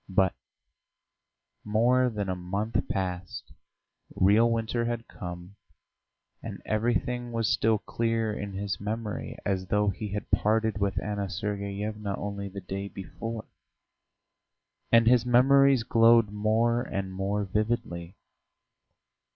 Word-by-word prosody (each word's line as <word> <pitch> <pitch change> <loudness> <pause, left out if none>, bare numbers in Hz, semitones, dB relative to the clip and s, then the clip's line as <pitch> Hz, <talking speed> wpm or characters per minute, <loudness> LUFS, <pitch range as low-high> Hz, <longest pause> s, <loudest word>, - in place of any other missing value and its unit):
But 95 -1 +3 1.3
more 120 +4 +3
than 105 -4 -3
a 95 - -1
month 100 +5 -2
passed, 90 -2 -4 0.6
real 105 +5 +5
winter 115 +1 0
had 120 -1 -3
come, 90 +2 -8 0.8
and - - -7
everything 120 +2 0
was 115 -1 0
still 110 -1 +3
clear 115 0 -1
in 100 -1 -5
his 100 0 -3
memory 105 +1 -4
as 95 -1 -1
though 105 +1 +2
he 105 +2 -4
had 105 - -5
parted 110 0 +2
with 100 -1 0
Anna 100 -2 -2
Sergeyevna 100 +1 -3
only 100 -1 -4
the 100 +1 -7
day 95 +2 -5
before. 110 +4 -6 1.5
And 115 0 +6
his 120 0 +5
memories 135 +1 +5
glowed 115 -2 +5
more 110 +3 +2
and 95 -4 -4
more 100 +2 -1
vividly. 105 -4 -2
105 Hz, 120 wpm, -28 LUFS, 100-115 Hz, 1.5 s, And